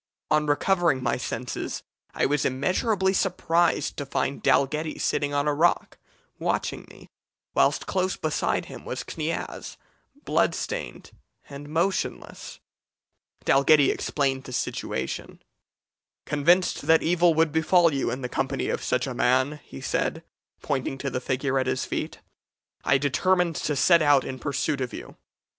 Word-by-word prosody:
On 150 0 +3
recovering 160 -2 +2
my 120 - +1
senses, 125 0 -4 0.3
I - - +2
was 145 +1 +1
immeasurably 190 - +1
surprised 175 -3 +1
to 145 - -3
find 140 0 -2
Dalghetty 150 +3 +1
sitting 145 0 0
on 145 +1 0
a 150 - +2
rock 165 +4 +1 0.4
watching - - -2
me, - - -15 0.5
whilst - - +2
close 185 0 -1
beside 155 -1 -1
him - - -10
was - - -5
Kniaz, - - -5 0.5
bloodstained - - -1 0.4
and 145 +1 -9
motionless. 170 +5 -2 0.9
"Dalghetty 140 +1 +5
explained 135 -2 -1
the 130 - -8
situation. 65 - -4 0.9
'Convinced 170 +5 +2
that 160 0 +5
evil 170 0 +3
would 160 -1 +3
befall 160 +1 +3
you 135 - 0
in 130 - -4
the 125 - -2
company 135 +2 -2
of - - -2
such 125 -1 0
a 130 - -4
man,' 130 +5 +1
he 70 - -11
said, - - -1 0.4
pointing 135 -1 -2
to 135 0 -4
the 125 - -2
figure 130 +1 0
at 130 - -1
his 130 0 -1
feet, - - -4 0.6
'I 135 - +4
determined 170 +5 +1
to 150 - -1
set 170 +4 +5
out 145 -3 +4
in 130 -1 -6
pursuit 140 +1 -1
of 125 - -3
you. - - -9
145 Hz, 145 wpm, -25 LUFS, 130-165 Hz, 0.9 s, Dalghetty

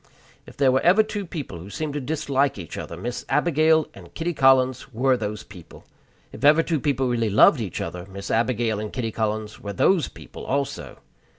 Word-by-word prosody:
If - - -14
there 135 -2 +4
were 130 +1 +2
ever 190 +5 +5
two 205 -3 -5
people 140 - -6
who 90 +4 -10
seemed 150 +8 -4
to 145 - -3
dislike 140 -1 0
each 85 -5 -8
other, - - -7
Miss 120 +1 -5
Abigail 155 0 +3
and - - -14
Kitty 170 +1 -2
Collins 130 -2 +3
were 130 +3 +2
those 105 -3 -4
people. 90 -4 -14 0.5
If - - -11
ever 155 +3 +6
two 160 -3 -1
people 135 -3 0
really 115 -3 0
loved 110 +6 +5
each 95 -6 -4
other, 90 +2 -6
Miss 100 0 -7
Abigail 115 -2 0
and 105 0 -5
Kitty 115 -3 -3
Collins 110 -1 -3
were 100 -1 -6
those 175 - +2
people - - -12
also. 140 +1 -3
130 Hz, 195 wpm, -24 LUFS, 105-150 Hz, 0.5 s, ever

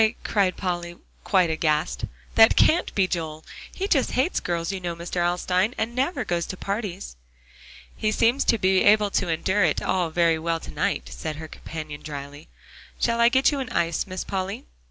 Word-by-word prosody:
cried 195 -3 +1
Polly 175 -2 -3 0.3
quite 185 -4 +3
aghast, 155 -1 0 0.3
"that 225 0 +7
can't 335 +3 +3
be 195 -2 +3
Joel. 160 -3 -4 0.3
He 390 - -3
just 280 -9 +1
hates 270 +8 +1
girls, 170 0 -2
you 195 - -4
know, 175 -2 -4
Mr. 170 +2 -6
Alstyne, 180 +5 +1
and 220 +2 -2
never 265 0 -1
goes 175 -3 -1
to 185 - -6
parties." 200 - -4 0.8
"He 215 - 0
seems 235 +5 +2
to 230 - +3
be 190 -1 +3
able 210 0 +4
to 185 - 0
endure 190 +5 +1
it 155 -4 +2
all 180 -3 0
very 165 0 +2
well 165 0 -1
to - - -9
night," - - -2
said 155 -1 -5
her 160 +1 -8
companion 155 -1 -8
dryly. 145 0 -8 0.5
"Shall 235 0 +1
I 235 - +7
get 265 +3 +3
you 285 - -2
an 260 -2 -4
ice, 170 -3 0
Miss 185 0 -4
Polly?" 190 - -4
185 Hz, 185 wpm, -24 LUFS, 165-215 Hz, 0.8 s, that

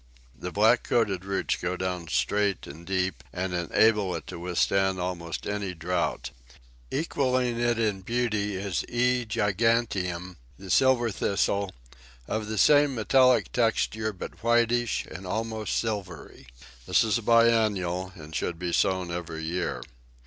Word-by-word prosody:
The 65 - -7
black - - +4
coated 100 -6 0
roots 100 0 -1
go 90 +1 -3
down 90 -2 -3
straight 100 +4 0
and 80 +5 -11
deep, 95 -1 -1
and 90 0 -3
enable 95 +3 +2
it - - -6
to - - -8
withstand 95 +2 +1
almost 90 -2 -4
any 100 -3 -3
drought. 85 +2 -2 0.6
Equalling 130 -5 0
it 120 -1 +1
in 105 -4 0
beauty 105 -2 -1
is 95 -2 -2
E. 125 0 +1
giganteum, 105 -5 0 0.2
the 95 -1 -8
Silver 130 -3 +4
Thistle, 100 0 0 0.6
of 110 -1 -2
the 110 0 -4
same 145 +2 +5
metallic 125 +3 +3
texture, 110 -2 0
but 95 - -9
whitish 120 0 +2
and 95 0 -9
almost 110 +1 -2
silvery. 100 - -5 0.4
This - - +4
is 110 -1 +1
a - - -8
biennial, 105 -6 +2
and 80 -3 -11
should 85 +4 -2
be 90 0 -3
sown 95 -2 +1
every 85 -2 -5
year. 80 -7 -2
100 Hz, 140 wpm, -27 LUFS, 90-115 Hz, 0.6 s, same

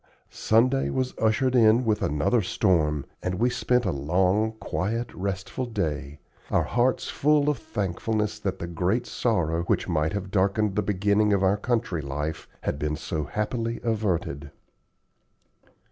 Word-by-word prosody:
Sunday 125 +5 +2
was 130 -1 -1
ushered 120 +4 +2
in 115 +1 +5
with 110 -2 +1
another 75 +11 +1
storm, 80 -7 +1 0.2
and 90 0 -2
we 120 +6 +1
spent 125 -1 +1
a 90 - +1
long, 90 +9 +1
quiet, 110 +2 -3
restful 100 +6 -3
day, 75 -10 -3 0.3
our - - +2
hearts 125 +2 +1
full 150 0 +3
of 140 - -5
thankfulness 105 +3 -2
that 95 -2 -2
the 85 - -5
great 90 +8 0
sorrow, 85 -12 0
which - - 0
might 80 -1 0
have 100 -2 -4
darkened 100 +1 +1
the 105 - +2
beginning 105 +1 +2
of 100 -1 +2
our 95 +1 +4
country 105 -6 -1
life, 75 +3 -4
had 70 - -2
been 75 +1 -1
so 80 0 -3
happily 115 - -2
averted. 100 -11 -1
100 Hz, 145 wpm, -26 LUFS, 85-115 Hz, 0.3 s, in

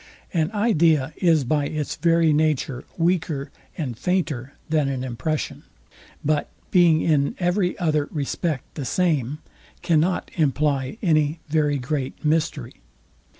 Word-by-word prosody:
An 160 -2 +1
idea 165 - +2
is 165 -5 +3
by 145 +3 0
its 150 -1 -3
very 165 -2 +3
nature 150 -4 0
weaker 165 -5 0 0.3
and 135 -8 -3
fainter 145 -4 -1
than 155 -4 +1
an 130 -2 -3
impression; 140 +5 -3 0.6
but 150 0 +1 0.2
being 170 -4 +5
in 145 -3 +2
every 180 +1 0
other 155 -4 +1
respect 150 0 -3
the 145 - -5
same, 150 -5 0 0.5
cannot 175 +1 +1
imply 145 -1 0
any 155 -2 +2
very 150 -2 +2
great 135 +2 -4
mystery. 150 -5 0
155 Hz, 120 wpm, -23 LUFS, 140-170 Hz, 0.6 s, being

